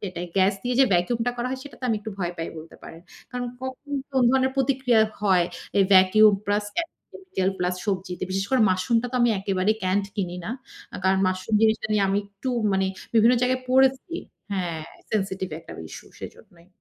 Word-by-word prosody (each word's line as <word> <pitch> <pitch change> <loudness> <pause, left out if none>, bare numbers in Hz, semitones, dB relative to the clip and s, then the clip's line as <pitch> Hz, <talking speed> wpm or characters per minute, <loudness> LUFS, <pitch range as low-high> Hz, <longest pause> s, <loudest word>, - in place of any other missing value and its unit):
সেটাই 180 -3 -5
গ্যাস 190 +1 +4
দিয়ে 250 0 -1
যে - - +8
ভ্যাকুমটা 230 +7 +1
করা 245 +1 -2
হয় 260 0 -4
সেটাতে 275 -2 -10
আমি 220 - +2
একটু 220 +1 -6
ভয় 175 -2 -2
পাই, 165 - -3
বলতে 160 +1 -12
পারেন। 165 - -11 0.3
কারণ 245 0 -3 0.2
কখন 260 +2 -7 0.2
কোন 260 -1 +3
ধরনের 260 0 +2
প্রতিক্রিয়া 260 -3 +2 0.2
হয় 185 -4 +3 0.3
এই 195 - +6
ভ্যাকুম 190 +3 +7 0.2
প্লাস 205 +1 +1
কেমিক্যাল 340 - -4
প্লাস 180 0 0
সবজিতে। 185 -2 -3
বিশেষ 195 +1 -1
করে 260 -2 +3
মাশরুমটা 230 +6 +1
তো 255 - 0
আমি 240 -1 +4
একেবারেই 195 +2 +1
ক্যান্ড 190 +2 +1
কিনি 180 -3 -2
না। - - -4 0.4
আ - - -3
কারণ 190 0 +3
মাশরুম 185 +3 -1
জিনিসটা 220 0 +3
নিয়ে 205 -1 +3
আমি 195 - +2
একটু 200 +5 -7 0.2
মানে 190 0 +2 0.3
বিভিন্ন 230 +2 +6
জায়গায় 255 +1 +1
পড়েছি 265 +5 +3 0.4
হ্যাঁ, 175 -4 -2 0.3
সেনসিটিভ 190 -3 -1
একটা 165 - -11 0.2
ইস্যু - - -10
সেজন্যই। 170 0 -12
205 Hz, 180 wpm, -24 LUFS, 185-250 Hz, 0.4 s, যে